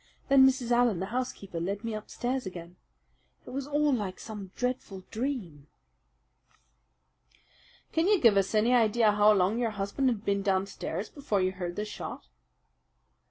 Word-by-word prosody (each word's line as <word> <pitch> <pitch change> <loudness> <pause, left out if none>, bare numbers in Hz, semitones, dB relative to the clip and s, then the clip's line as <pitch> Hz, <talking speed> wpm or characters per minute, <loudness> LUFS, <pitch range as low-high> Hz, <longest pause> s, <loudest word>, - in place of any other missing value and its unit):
Then 270 -1 +7
Mrs. 255 -2 0
Allen, 240 -6 +3
the 190 - -2
housekeeper, 225 -8 -3
led 195 +5 -3
me 230 -1 -3
upstairs 245 +3 -3
again. 175 -1 -9 0.7
It - - -9
was 275 +1 -4
all 295 0 +2
like 205 -6 -3
some 210 -4 -8
dreadful 245 -7 -3
dream." 215 - -4 2.2
"Can 325 +2 +1
you 410 -2 +4
give 230 -7 +5
us 195 +2 +1
any 225 +4 +3
idea 225 -2 +4
how 210 +1 +5
long 200 +3 +2
your 235 -2 +1
husband 210 +6 -1
had 225 -3 -3
been 200 0 +1
downstairs 195 0 -2
before 275 -9 -1
you 185 0 +1
heard 180 -2 -5
the 210 - -2
shot?" 210 - -7
215 Hz, 155 wpm, -29 LUFS, 195-250 Hz, 2.2 s, Then